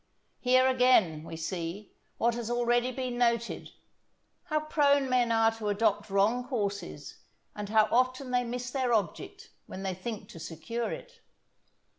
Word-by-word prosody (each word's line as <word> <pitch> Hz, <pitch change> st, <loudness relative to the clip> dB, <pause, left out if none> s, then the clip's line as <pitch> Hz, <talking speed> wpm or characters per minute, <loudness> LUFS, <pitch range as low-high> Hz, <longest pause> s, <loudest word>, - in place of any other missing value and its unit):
Here, 255 Hz, 0 st, +4 dB
again, 250 Hz, -12 st, +4 dB
we 165 Hz, -, -8 dB
see, 175 Hz, +4 st, -5 dB, 0.3 s
what 235 Hz, +1 st, +2 dB
has 235 Hz, -1 st, -4 dB
already 240 Hz, +1 st, +1 dB
been 255 Hz, -1 st, -4 dB
noted, 235 Hz, -1 st, 0 dB, 0.8 s
how 305 Hz, -3 st, 0 dB
prone 285 Hz, -3 st, +3 dB
men 250 Hz, -2 st, +2 dB
are 225 Hz, 0 st, +4 dB
to 225 Hz, -2 st, -4 dB
adopt 205 Hz, 0 st, +1 dB
wrong 215 Hz, +6 st, +2 dB
courses, 205 Hz, -6 st, -4 dB, 0.4 s
and 205 Hz, -1 st, -5 dB
how 215 Hz, 0 st, +4 dB
often 255 Hz, +1 st, +1 dB
they 250 Hz, 0 st, +2 dB
miss 245 Hz, +1 st, -4 dB
their 255 Hz, -3 st, +1 dB
object 210 Hz, -, -3 dB, 0.2 s
when 190 Hz, -, -7 dB
they 190 Hz, -1 st, -1 dB
think 205 Hz, +4 st, -6 dB
to 165 Hz, -, -10 dB
secure 170 Hz, +9 st, -4 dB
it. -, -, -9 dB
235 Hz, 150 wpm, -29 LUFS, 205-255 Hz, 0.8 s, Here